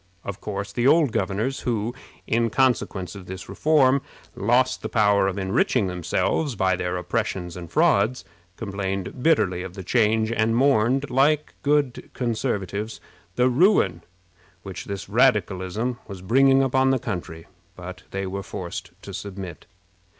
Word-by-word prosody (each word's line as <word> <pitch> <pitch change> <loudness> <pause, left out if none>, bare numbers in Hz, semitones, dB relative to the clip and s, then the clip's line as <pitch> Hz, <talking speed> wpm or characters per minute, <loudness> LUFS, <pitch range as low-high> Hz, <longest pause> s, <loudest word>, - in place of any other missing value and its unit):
Of 100 -1 -6
course, 100 -1 -5
the 120 +1 +1
old 150 -3 +5
governors, 110 +7 -1
who, 115 -1 -2 0.3
in 115 0 +1
consequence 115 -8 0
of 95 -3 -10
this 95 0 -7
reform, 140 -3 +3 0.3
lost 125 +5 +2
the - - -4
power 105 -3 +3
of 95 0 -2
enriching 100 +4 +1
themselves 90 - -1
by 95 -1 +2
their 90 0 -2
oppressions 90 -2 -3
and 85 -2 -8
frauds, 130 - +2 0.3
complained 100 +1 -4
bitterly 100 - +2
of 95 0 -7
the 95 - -7
change, 110 +2 +2
and 115 0 +1
mourned, 135 +1 +2
like 145 +4 +2
good 145 -3 0
Conservatives, 110 -3 -2 0.4
the 125 +1 +3
ruin 125 - +3 0.6
which 95 -2 -7
this 100 -2 -5
radicalism 105 +7 +1
was 95 -3 -9
bringing 135 +6 +4
upon 130 0 +2
the 135 - +3
country, 85 -7 -5 0.3
but 90 0 -9
they 95 0 -3
were 95 +1 -4
forced 90 -2 -6
to 100 - -8
submit. 95 -3 -7
105 Hz, 145 wpm, -24 LUFS, 95-130 Hz, 0.6 s, old